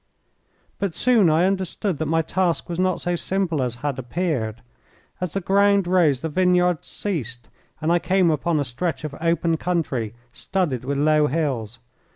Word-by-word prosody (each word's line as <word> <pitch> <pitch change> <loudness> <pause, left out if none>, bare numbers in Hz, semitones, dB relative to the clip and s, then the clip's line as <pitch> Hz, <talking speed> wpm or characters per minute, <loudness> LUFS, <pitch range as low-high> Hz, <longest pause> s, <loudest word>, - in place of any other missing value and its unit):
But 195 -5 -2
soon 230 -8 +4
I 160 +3 +3
understood 190 -2 -1
that 160 - -1
my 165 +1 +2
task 175 -1 0
was 175 0 -4
not 185 -1 +1
so 175 0 -1
simple 175 -4 -1
as 125 -2 -2
had 140 -3 -1
appeared. 120 -5 -2 0.6
As 180 -4 -3
the 195 - -1
ground 200 +1 +3
rose 170 -8 +3
the - - -2
vineyards 180 0 +2
ceased, 125 - -4 0.3
and 155 +2 0
I 175 - +4
came 185 0 +2
upon 155 +1 0
a 145 - 0
stretch 160 +6 -3
of 155 -2 -5
open 165 0 +1
country 140 -11 -2 0.2
studded 150 -11 -2
with 140 +1 -1
low 150 +1 +3
hills. 125 -7 -2
165 Hz, 170 wpm, -23 LUFS, 140-180 Hz, 0.6 s, soon